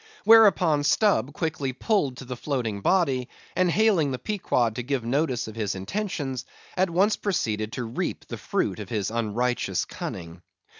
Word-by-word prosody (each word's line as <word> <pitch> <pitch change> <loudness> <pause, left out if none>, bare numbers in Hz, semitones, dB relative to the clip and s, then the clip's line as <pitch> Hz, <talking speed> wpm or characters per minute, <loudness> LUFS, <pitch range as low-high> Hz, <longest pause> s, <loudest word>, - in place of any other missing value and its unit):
Whereupon 195 -9 +6
Stubb 195 - +2
quickly 145 -4 -2
pulled 140 - 0
to 130 - -8
the 125 0 -5
floating 120 -6 -3
body, 135 - +1 0.3
and 185 0 +3
hailing 195 -6 +3
the 130 - -2
Pequod 125 - 0
to 125 - -2
give 125 -1 -2
notice 130 -1 0
of 110 - -7
his 105 -3 -2
intentions, 140 - -3 0.3
at 185 0 +2
once 195 +5 +3
proceeded 110 - -2
to 125 - -3
reap 115 +1 -4
the - - -7
fruit - - -1
of - - -7
his 105 -3 -2
unrighteous 115 +2 -1
cunning. 85 +1 -7
135 Hz, 160 wpm, -25 LUFS, 115-180 Hz, 0.3 s, Whereupon